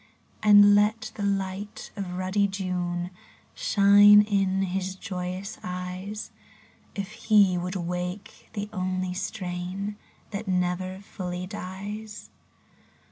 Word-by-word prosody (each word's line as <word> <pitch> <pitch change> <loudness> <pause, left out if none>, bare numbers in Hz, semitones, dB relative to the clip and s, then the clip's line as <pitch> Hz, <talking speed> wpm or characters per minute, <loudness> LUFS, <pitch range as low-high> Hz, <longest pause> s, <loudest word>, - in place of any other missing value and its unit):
And 205 -1 +8
let 210 +2 +2
the - - -7
light 195 0 -3
of 190 -3 -5
ruddy 190 +2 +1
June 180 -2 -3 0.4
Shine 205 - +7
in 195 -2 +1
his 190 0 -2
joyous 185 +2 -5
eyes. 180 +3 -5 0.6
If 200 +1 -4
he 210 -4 +4
would 180 +2 -3
wake 180 +3 -5
the 205 -1 -3
only 185 -1 -2
strain 190 +1 -4 0.3
That 205 +1 -5
never 185 +1 -1
fully 180 -2 -5
dies 205 +2 -7
190 Hz, 105 wpm, -26 LUFS, 180-205 Hz, 0.6 s, And